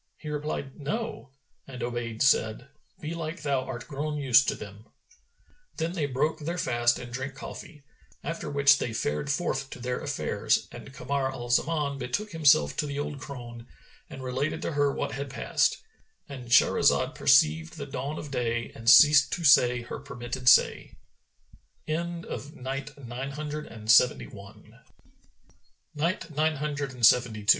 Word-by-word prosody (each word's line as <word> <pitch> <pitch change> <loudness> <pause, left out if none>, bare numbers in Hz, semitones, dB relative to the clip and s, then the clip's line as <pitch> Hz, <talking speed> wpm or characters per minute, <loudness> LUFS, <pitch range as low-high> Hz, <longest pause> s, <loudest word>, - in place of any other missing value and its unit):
He 155 - -8
replied, 150 -2 -4
"No," 150 - -4 0.4
and 130 -2 -7
Obayd 120 -1 -3
said, 125 -1 +2 0.3
"Belike 160 0 -5
thou 140 -3 +1
art 130 -2 -7
grown 150 +1 -3
used 130 -3 +4
to - - 0
them." 105 +2 -11 0.9
Then 165 0 -1
they 165 -5 -2
broke 150 +4 -1
their 170 +4 -4
fast 120 -6 +1
and 120 -1 -9
drank 135 +1 -5
coffee, 150 +1 -10 0.4
after 165 -2 -4
which 140 -1 +4
they 115 - -3
fared 75 - -2
forth 135 -3 -2
to - - -9
their 125 +1 -3
affairs, - - -1
and - - -10
Kamar 135 +1 -2
al 120 -2 -6
Zaman 140 +1 0
betook 205 +13 -3
himself 145 - +4
to 150 - -1
the 140 0 -5
old 145 -1 -4
crone, 120 -3 -9 0.4
and 130 - -9
related 130 +4 -2
to - - -2
her 145 -1 +2
what - - -3
had 140 0 -5
passed,—And 135 -1 -3
Shahrazad 125 +2 +4
perceived 80 - +3
the 140 - -5
dawn 140 +2 -5
of 145 - -7
day 120 -2 -2
and 115 0 -1
ceased 145 +1 +7
to 175 - -3
say 125 -4 +5
her 115 - -7
permitted 125 -2 -1
say. - - +4
135 Hz, 130 wpm, -27 LUFS, 120-145 Hz, 0.9 s, ceased